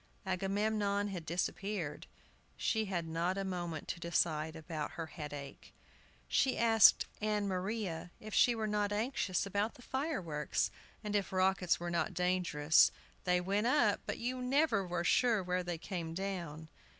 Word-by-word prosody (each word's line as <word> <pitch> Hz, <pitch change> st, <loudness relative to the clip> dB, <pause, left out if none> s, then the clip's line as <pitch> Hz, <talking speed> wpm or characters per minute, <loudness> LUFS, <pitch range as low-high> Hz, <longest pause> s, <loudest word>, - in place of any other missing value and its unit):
Agamemnon 200 Hz, +2 st, 0 dB
had 175 Hz, -5 st, -6 dB
disappeared. 175 Hz, -1 st, -3 dB, 0.5 s
She 220 Hz, -1 st, +1 dB
had 175 Hz, -4 st, -2 dB
not 170 Hz, +4 st, -1 dB
a 195 Hz, -, -1 dB
moment 175 Hz, -4 st, -4 dB
to -, -, -3 dB
decide 160 Hz, -2 st, 0 dB
about 160 Hz, -1 st, -5 dB
her 165 Hz, 0 st, -4 dB
headache. 145 Hz, -3 st, -8 dB, 0.5 s
She 265 Hz, -2 st, +2 dB
asked 225 Hz, -2 st, +6 dB, 0.2 s
Ann 210 Hz, -1 st, 0 dB
Maria 185 Hz, -2 st, -3 dB
if 215 Hz, -1 st, -9 dB
she 245 Hz, -, +5 dB
were 220 Hz, -1 st, -2 dB
not 210 Hz, -1 st, 0 dB
anxious 205 Hz, -4 st, 0 dB
about 205 Hz, +3 st, -1 dB
the 245 Hz, -, -15 dB
fireworks, 195 Hz, -, -1 dB, 0.3 s
and 210 Hz, -1 st, -2 dB
if 200 Hz, -2 st, 0 dB
rockets 185 Hz, -1 st, +2 dB
were 175 Hz, 0 st, -3 dB
not 170 Hz, -, -1 dB
dangerous. 180 Hz, -4 st, +4 dB, 0.3 s
They 180 Hz, -1 st, +3 dB
went 200 Hz, +5 st, 0 dB
up, 245 Hz, -7 st, +3 dB
but -, -, -2 dB
you 250 Hz, +2 st, -2 dB
were -, -, -5 dB
never 250 Hz, -, +1 dB
sure 225 Hz, +1 st, +3 dB
where 180 Hz, 0 st, 0 dB
they 175 Hz, -1 st, -3 dB
came 165 Hz, -2 st, -5 dB
down. 170 Hz, -5 st, -4 dB
190 Hz, 150 wpm, -34 LUFS, 170-210 Hz, 0.5 s, asked